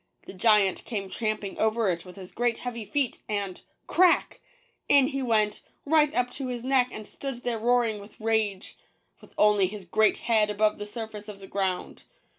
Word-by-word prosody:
The - - -9
giant 200 -1 +3
came 200 -5 -5
tramping 215 -3 -3
over 220 0 +1
it 170 +1 -5
with 180 - -12
his 185 -2 -11
great 240 -1 0
heavy 235 -3 -5
feet, 275 0 -1
and 200 -3 -3
— - - -43
" - - -47
crack! 355 0 +3
" - - -35
— - - -47
in 275 -1 +6
he 275 -2 -3
went, 215 -4 +1 0.2
right 300 0 +4
up 245 0 +1
to 270 -2 -5
his 245 -2 -5
neck 260 -1 +3
and 215 - -8
stood 270 -3 -7
there 235 -2 -1
roaring 235 -2 +2
with 200 +1 -14
rage, 215 -3 -1 0.4
with - - -18
only 210 -2 +4
his 200 0 -8
great 215 +5 +3
head 220 -3 +2
above 210 0 +1
the 205 - -5
surface 215 -1 -7
of 205 -2 -9
the 195 - -10
ground. 190 -2 -3
220 Hz, 205 wpm, -27 LUFS, 205-245 Hz, 0.4 s, in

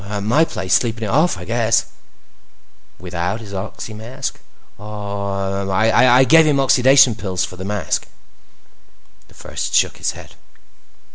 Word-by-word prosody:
"At 105 -1 -4
my 125 +10 +3
place, 95 - -3
sleeping 115 -1 +1
it 105 - -3
off, 155 - +2
I 90 - -9
guess." 115 +1 +1 1.1
"Without 90 +3 -4
his 105 -3 -11
oxy 100 +2 -6
mask?" 110 +4 -6 0.4
"Oh, 100 -2 -4
I 115 +6 +4
gave 160 +3 +5
him 150 - +2
my 135 - +2
oxidation 130 -1 +5
pills 95 -4 -3
for - - -11
the 90 - -8
mask." 105 -2 -2 1.2
The - - -22
First - - -5
shook - - +2
his - - -2
head. - - -13
105 Hz, 145 wpm, -19 LUFS, 100-125 Hz, 1.2 s, gave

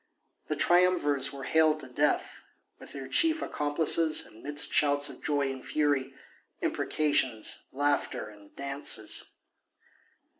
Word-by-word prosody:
The - - -2
triumvirs 175 -6 +2
were 140 -1 -9
haled 155 +2 +2
to - - -8
death, 125 - -1 0.4
with - - -13
their 135 -2 -7
chief 320 - +2
accomplices, 155 +2 +2
amidst 145 +7 0
shouts 145 -1 +2
of - - -14
joy 145 -2 0
and 130 -1 -9
fury, 140 -3 -1 0.4
imprecations, 130 -7 -1
laughter 145 -4 -1
and 105 -1 -17
dances. 140 +1 -1
145 Hz, 115 wpm, -28 LUFS, 135-155 Hz, 0.4 s, triumvirs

